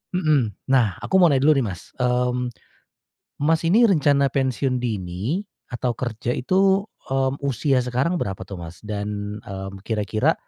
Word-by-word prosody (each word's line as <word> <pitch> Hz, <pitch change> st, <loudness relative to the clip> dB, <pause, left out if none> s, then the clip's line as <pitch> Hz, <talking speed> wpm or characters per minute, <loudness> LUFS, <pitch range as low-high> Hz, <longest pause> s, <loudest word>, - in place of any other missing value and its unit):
mhm, 150 Hz, -, +2 dB, 0.2 s
nah 115 Hz, -9 st, +3 dB
aku 190 Hz, -, -1 dB
mau 180 Hz, -, +7 dB
nanya 135 Hz, 0 st, +2 dB
dulu 155 Hz, -, +7 dB
nih 120 Hz, -, 0 dB
Mas, 90 Hz, -, -11 dB
mmm, 125 Hz, 0 st, +1 dB, 0.9 s
Mas 160 Hz, +2 st, +3 dB
ini 220 Hz, +8 st, +5 dB
rencana 140 Hz, -5 st, +3 dB
pensiun 130 Hz, -1 st, 0 dB
dini 105 Hz, -, -2 dB, 0.3 s
atau 125 Hz, 0 st, -1 dB
kerja 120 Hz, -1 st, -3 dB
itu, 190 Hz, +8 st, +2 dB, 0.2 s
mmm, 135 Hz, +1 st, 0 dB
usia 135 Hz, 0 st, +1 dB
sekarang 125 Hz, +7 st, 0 dB
berapa 95 Hz, -, -3 dB
tuh 95 Hz, -1 st, -8 dB
Mas? 85 Hz, 0 st, -9 dB
Dan, 105 Hz, 0 st, -4 dB
mmm, 95 Hz, 0 st, -7 dB
kira-kira, 110 Hz, -1 st, +1 dB
125 Hz, 150 wpm, -23 LUFS, 105-140 Hz, 0.9 s, mau